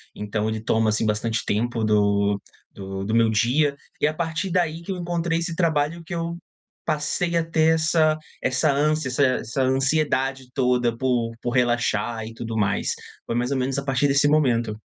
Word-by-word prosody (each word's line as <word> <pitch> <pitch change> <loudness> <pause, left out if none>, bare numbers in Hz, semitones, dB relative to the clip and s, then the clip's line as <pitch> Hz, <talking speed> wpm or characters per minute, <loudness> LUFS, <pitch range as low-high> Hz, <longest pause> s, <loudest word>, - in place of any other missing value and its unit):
Então, 105 +1 -2
ele 110 -1 -3
toma, 110 -1 +2
assim, 110 +1 0
bastante 110 +2 -1
tempo 115 +2 -1
do 100 -1 +2 0.3
do 95 0 -6
do 110 - -2
meu 115 -1 +4
dia. 130 +7 +2 0.3
E - - +4
a 155 - -1
partir 170 +3 -2
daí, 170 -2 0
que 195 - -6
eu 185 - -3
encontrei 170 -1 -1
esse 170 -1 -3
trabalho, 165 -1 0
que 180 - -7
eu 170 0 -3 0.5
passei 170 +3 0
a 165 - +3
ter 160 0 +3
essa 155 0 +3 0.3
essa 130 +3 +2
ânsia 150 0 +1
essa 130 +3 +1 0.2
essa 130 +4 -2
ansiedade 135 -1 +1
toda 125 -3 +1
por 120 -2 0
por 120 - -2
relaxar 120 -3 0
e 115 - -9
tudo 115 -1 -5
mais. 100 -2 0 0.3
Foi - - -3
mais 125 +2 0
ou 135 - +1
menos 130 +1 -1
a - - -5
partir 135 +1 +1
desse 140 +1 +3
momento. 120 -8 +2
130 Hz, 185 wpm, -23 LUFS, 115-155 Hz, 0.5 s, meu